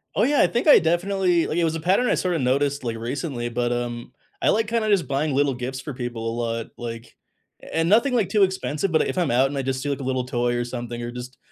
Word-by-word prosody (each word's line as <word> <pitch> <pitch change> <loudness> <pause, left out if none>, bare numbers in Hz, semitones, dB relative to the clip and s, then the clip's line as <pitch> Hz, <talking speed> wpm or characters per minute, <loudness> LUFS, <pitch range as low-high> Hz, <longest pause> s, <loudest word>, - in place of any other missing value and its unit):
Oh - - +3
yeah, 285 +3 +3
I - - +5
think 240 +6 -1
I 295 - +9
definitely 175 +1 +1
like, 160 - -2
it 175 - +2
was 165 0 +1
a - - -3
pattern 190 +10 +2
I - - +3
sorta 180 -3 0
noticed, 140 +2 0
like, 115 -1 -3
recently, 120 +1 -3
but, 120 0 -1
um, 120 -1 -4 0.3
I - - +3
like 220 0 +2
kinda 230 -1 0
just 185 -9 +2
buying 140 +1 0
little 140 0 +2
gifts 130 +1 -5
for 145 - -6
people 120 -2 -4
a - - -2
lot. 115 -1 -3
Like 115 -1 -7 0.5
A - - -6
and 165 +1 +2
nothing 235 +6 +4
like 225 -6 +1
too 210 -2 +3
expensive, 190 -2 -1
but 160 - +2
if - - -4
I'm 175 -7 +1
out 130 +3 +4
and 140 +1 -5
I - - 0
just 130 0 -2
see 145 - -3
like 140 - -2
a 135 - -5
little 130 -1 -1
toy 120 -2 0
or 120 - 0
something, 120 -1 -5
or 120 0 -4
just 125 +2 -8
135 Hz, 270 wpm, -23 LUFS, 120-175 Hz, 0.5 s, I